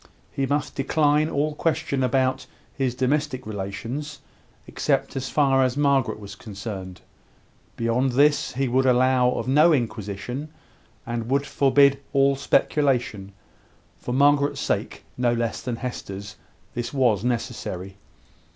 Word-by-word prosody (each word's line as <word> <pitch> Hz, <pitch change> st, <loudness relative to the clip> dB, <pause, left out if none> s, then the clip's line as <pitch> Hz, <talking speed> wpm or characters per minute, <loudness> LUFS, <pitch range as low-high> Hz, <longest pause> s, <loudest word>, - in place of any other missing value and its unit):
He 135 Hz, -1 st, -1 dB
must 145 Hz, +2 st, -1 dB
decline 150 Hz, +2 st, +2 dB
all 150 Hz, 0 st, 0 dB
question 160 Hz, -3 st, -1 dB
about 130 Hz, +1 st, +1 dB, 0.3 s
his 130 Hz, -3 st, -1 dB
domestic 130 Hz, 0 st, -1 dB
relations, 115 Hz, +9 st, -5 dB, 0.5 s
except -, -, -1 dB
as 135 Hz, -1 st, -3 dB
far 135 Hz, -3 st, +3 dB
as 130 Hz, +1 st, 0 dB
Margaret 140 Hz, -5 st, +2 dB
was 100 Hz, -1 st, -9 dB
concerned. 95 Hz, -3 st, -8 dB, 0.8 s
Beyond 120 Hz, +3 st, +1 dB
this, 145 Hz, +3 st, +3 dB
he 135 Hz, +1 st, 0 dB
would 130 Hz, +2 st, +2 dB
allow 125 Hz, 0 st, +4 dB
of 125 Hz, -, -3 dB
no 150 Hz, +6 st, +5 dB
inquisition, 120 Hz, +2 st, -3 dB, 0.6 s
and 120 Hz, -1 st, -4 dB
would 140 Hz, +1 st, +1 dB
forbid 140 Hz, 0 st, +4 dB
all 140 Hz, 0 st, +4 dB
speculation. 125 Hz, -8 st, 0 dB, 0.7 s
For -, -, -5 dB
Margaret's 145 Hz, +2 st, +3 dB
sake, -, -, -2 dB, 0.2 s
no 120 Hz, -1 st, +2 dB
less 115 Hz, -1 st, -2 dB
than 125 Hz, -2 st, -3 dB
Hester's, 100 Hz, -5 st, -6 dB, 0.4 s
this 120 Hz, -1 st, -4 dB
was 120 Hz, -8 st, +2 dB
necessary. 115 Hz, -6 st, -3 dB
130 Hz, 125 wpm, -24 LUFS, 115-140 Hz, 0.8 s, no